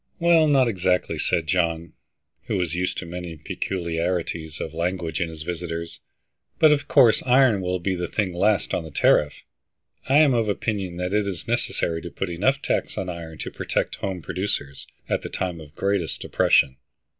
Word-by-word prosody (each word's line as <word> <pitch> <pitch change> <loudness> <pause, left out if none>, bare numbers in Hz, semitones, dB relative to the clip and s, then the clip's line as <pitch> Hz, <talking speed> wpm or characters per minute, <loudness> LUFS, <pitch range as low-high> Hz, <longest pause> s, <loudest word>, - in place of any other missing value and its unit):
"Well, 170 -2 +5
not 135 -4 +4
exactly," 90 -4 0
said 80 - 0
John, 85 -1 0 0.5
who - - 0
was 90 -3 -1
used 90 +1 -1
to - - -4
many 85 -1 -6
peculiarities 85 -1 -3
of 80 - -5
language 85 +1 -2
in 85 - 0
his 80 -1 -7
visitors. 85 -1 -5 0.6
"But, 155 -2 +6
of 145 -1 +1
course, 135 -9 +5
iron 125 -5 +4
will 90 0 -1
be 95 +2 -1
the 90 -1 -2
thing 100 -5 -1
last 100 +3 +1
on 85 - 0
the 80 - -8
tariff. 75 0 +2 0.7
I 135 - +5
am 150 -3 +6
of 115 -3 +1
opinion 100 -4 -2
that 90 +2 -2
it 105 -1 +2
is 90 -5 -5
necessary 80 -1 -1
to 85 - -7
put 95 +1 -4
enough 130 +12 +1
tax - - -1
on 95 - -3
iron 85 -2 -7
to - - -6
protect - - -2
home 95 -4 -4
producers 70 -9 -3 0.2
at - - 0
the - - -6
time 90 -3 -3
of 75 -1 -14
greatest 100 -5 -1
depression. 65 -1 +3
90 Hz, 180 wpm, -24 LUFS, 85-105 Hz, 0.7 s, But